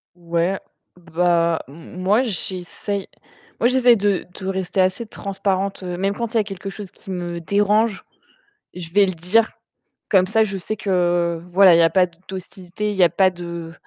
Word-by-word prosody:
Ouais. 170 +2 -1 0.4
Bah 170 -1 +1
m 165 +5 -10
moi, 210 +7 +3
j'essaye, 195 -1 -4 0.5
moi, 240 - +4
j'essaye 250 -2 +5
de 200 -2 0
de 190 - -7
rester 190 0 -1
assez 185 +5 +1
transparente, 195 -1 -2
heu, 180 -1 -4
même 195 +2 0
quand 235 +1 -4
il - - 0
y - - +5
a 210 - 0
quelque 195 -1 -7
chose 195 -1 -8
qui 195 - -13
me 175 -2 -4
dérange 205 +3 +1 0.7
je 175 -2 -8
vais 200 +2 +5
le 185 - -2
dire. 180 +7 +2 0.6
Comme 185 -2 +4
ça, 220 +2 +3
je 195 -2 -3
sais 205 +4 -4
que 175 -4 0
voilà, 190 -1 +7
il 165 - +5
y - - +6
a 165 - +5
pas 185 +2 +4
d 170 -2 -18
d'hostilité, 190 +2 -5
il 205 - -5
n'y 175 - +6
pas 185 +2 +3
de 170 -2 -7
185 Hz, 185 wpm, -21 LUFS, 175-200 Hz, 0.7 s, voilà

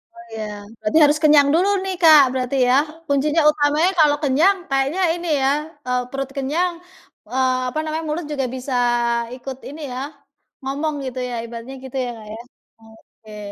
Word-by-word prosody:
Oh, 350 - -12
iya, 220 -1 -5 0.4
berarti 215 +9 0
harus 295 +1 +4
kenyang 295 -2 +6
dulu 365 +5 +3
nih, 380 -1 -3
Kak, 310 -3 +8
berarti 255 +1 -2
ya, 250 - +4 0.3
kuncinya 295 +3 +2
utamanya 300 +4 +2
kalau 295 -1 +5
kenyang 310 +9 +4
kayaknya 275 +7 0
ini 345 0 -6
ya, 265 - +3 0.4
eee, 250 0 +1
perut 270 0 -4
kenyang, 320 +7 0 0.6
eee, 260 -1 +2
apa 310 - -7
namanya, 315 +1 -3
mulut 315 +2 -3
juga 270 -3 -1
bisa 260 +1 -5 0.6
ikut 260 0 -8
ini 305 +2 -9
ya, 255 - -4 0.6
ngomong 290 +3 -2
gitu 255 0 -5
ya, - - -5
ibaratnya, 235 +3 -8
gitu 265 +1 -7
ya - - -4
Kak 215 - -12
ya. 225 - -8 0.4
Oke. 220 -1 -16
280 Hz, 170 wpm, -21 LUFS, 255-310 Hz, 0.6 s, Kak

